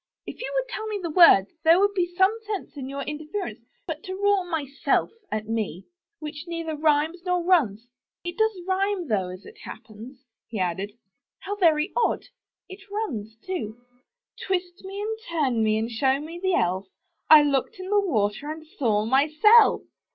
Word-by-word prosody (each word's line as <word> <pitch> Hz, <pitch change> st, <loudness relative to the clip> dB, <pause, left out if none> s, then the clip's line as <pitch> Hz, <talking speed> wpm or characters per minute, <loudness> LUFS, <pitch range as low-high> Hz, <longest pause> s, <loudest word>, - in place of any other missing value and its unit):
*Tf -, -, -8 dB
you -, -, -4 dB
would -, -, 0 dB
tell 440 Hz, -2 st, -5 dB
me 425 Hz, -1 st, -2 dB
the 340 Hz, -3 st, -4 dB
word 300 Hz, -, +7 dB, 0.2 s
there 330 Hz, +2 st, +6 dB
would 405 Hz, +1 st, +3 dB
be 355 Hz, -2 st, 0 dB
some 380 Hz, +4 st, +4 dB
sense 410 Hz, -6 st, -5 dB
in 265 Hz, -2 st, -6 dB
your 275 Hz, 0 st, -4 dB
interference; 305 Hz, +7 st, -5 dB, 0.3 s
but -, -, -5 dB
to 375 Hz, -2 st, -6 dB
roar 405 Hz, -1 st, +2 dB
*Myself 285 Hz, -5 st, 0 dB
!' 405 Hz, -, -38 dB
at 215 Hz, 0 st, -3 dB
me, 215 Hz, -5 st, -3 dB, 0.3 s
which 305 Hz, -1 st, -7 dB
neither 330 Hz, -2 st, -4 dB
rhymes 310 Hz, +3 st, +1 dB
nor 360 Hz, -1 st, 0 dB
runs 245 Hz, -, +2 dB, 0.2 s
— -, -, -68 dB
it 350 Hz, 0 st, -4 dB
does 440 Hz, -2 st, +1 dB
rhyme, 380 Hz, -3 st, 0 dB
though, 195 Hz, -4 st, +1 dB
as 185 Hz, +1 st, -10 dB
it 445 Hz, -, -14 dB
hap -, -, -9 dB
pens," 245 Hz, +5 st, -13 dB, 0.2 s
he 225 Hz, -, -6 dB
added: 190 Hz, +2 st, -2 dB, 0.5 s
*'how 405 Hz, +1 st, -4 dB
very 325 Hz, -2 st, +3 dB
odd! 480 Hz, -, +1 dB, 0.4 s
it 380 Hz, +1 st, -11 dB
runs, 235 Hz, -, -4 dB
too 240 Hz, -, -4 dB, 0.3 s
— -, -, -16 dB
Twist 360 Hz, -1 st, -2 dB
me 390 Hz, +1 st, -7 dB
and 440 Hz, +1 st, -3 dB
turn 270 Hz, -9 st, +1 dB
me 215 Hz, 0 st, +2 dB
and 225 Hz, +2 st, -2 dB
show 265 Hz, +4 st, +1 dB
me 325 Hz, +4 st, -8 dB
the 375 Hz, -1 st, +2 dB
Elf 185 Hz, +2 st, 0 dB, 0.2 s
— 335 Hz, -, -50 dB
I 310 Hz, -1 st, +10 dB
looked 280 Hz, +1 st, 0 dB
in 370 Hz, 0 st, -6 dB
the 415 Hz, -, +5 dB
water 230 Hz, -, -1 dB
and 315 Hz, 0 st, -8 dB
saw 225 Hz, -9 st, 0 dB
myself!' 310 Hz, -, +5 dB
315 Hz, 190 wpm, -25 LUFS, 240-380 Hz, 0.5 s, I